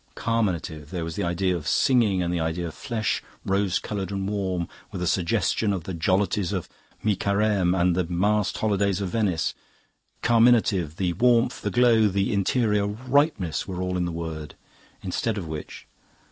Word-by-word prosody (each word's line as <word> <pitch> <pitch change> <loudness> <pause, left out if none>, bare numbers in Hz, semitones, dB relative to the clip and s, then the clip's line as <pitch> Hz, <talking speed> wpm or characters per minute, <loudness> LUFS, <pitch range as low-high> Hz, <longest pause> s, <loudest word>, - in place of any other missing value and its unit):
Carminative 90 -10 -1
there 90 -3 -3
was 80 -1 -5
the - - -2
idea 90 +2 0
of 75 -3 -5
singing 110 - +3
and 85 0 -1
the 85 - 0
idea 80 +2 -2
of 80 - -7
flesh, 110 -5 -2 0.2
rose 95 -1 +1
coloured 100 -3 -4
and 95 -1 -2
warm, 95 -4 -2 0.2
with - - -5
a 90 - -1
suggestion 95 +4 +1
of 95 -4 -2
the 95 - -5
jollities 95 +2 +1
of - - -3 0.4
mi 105 -2 +2
Careme 100 -2 +1
and 90 0 +3
the 90 -1 +1
masked 100 +4 +1
holidays 100 -3 +1
of 100 -2 -2
Venice. 95 -5 0 0.7
Carminative 115 -9 +3
the 90 -1 -1
warmth, 120 +4 +2
the - - -1
glow, 115 -3 +4
the 100 +2 0
interior 105 0 +1
ripeness 120 - 0
were 90 -2 -5
all 90 0 -2
in 90 -1 0
the 85 - -2
word. 80 -2 -6 0.5
Instead 105 +4 -1
of 90 -5 -4
which..." 80 -1 -7
95 Hz, 175 wpm, -25 LUFS, 85-105 Hz, 0.7 s, glow